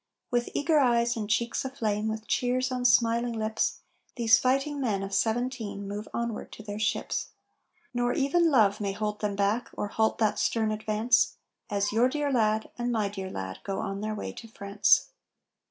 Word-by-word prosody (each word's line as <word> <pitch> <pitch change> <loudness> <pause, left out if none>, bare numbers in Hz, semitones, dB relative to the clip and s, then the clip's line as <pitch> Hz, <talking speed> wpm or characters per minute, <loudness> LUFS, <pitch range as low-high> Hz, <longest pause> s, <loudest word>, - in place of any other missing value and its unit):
With 240 -1 0
eager 310 +1 +3
eyes 235 -2 +3
and 215 -2 -4
cheeks 235 +2 0
aflame, 220 -5 -2
with 220 0 -3
cheers 255 +1 0
on 250 -1 -2
smiling 235 0 +3
lips, 220 0 -1 0.3
These 225 -2 +5
fighting 275 +3 0
men 205 -6 0
of 195 0 -5
'17 225 -2 -1
move 205 +2 -5
onward 235 -2 -4
to 215 - -10
their 205 0 -6
ships. 215 +1 -1 0.7
Nor 245 0 +1
even 325 +5 +3
love 215 -7 +3
may 200 -1 -1
hold 210 +1 -3
them 205 -1 -1
back, 205 +4 0
or 205 - -3
halt 220 +1 +1
that 215 -2 +1
stern 220 -2 +1
advance, 215 +2 +2 0.3
As 205 -1 0
your 235 +4 +3
dear 290 +1 -1
lad, 220 -3 +1
and 240 0 0
my 215 -4 0
dear 190 -2 -6
lad, 95 - -6
go 195 -1 -3
on 195 +1 -3
their 215 0 -2
way - - -5
to 230 - -10
France. 200 -1 +2
220 Hz, 180 wpm, -28 LUFS, 210-245 Hz, 0.7 s, These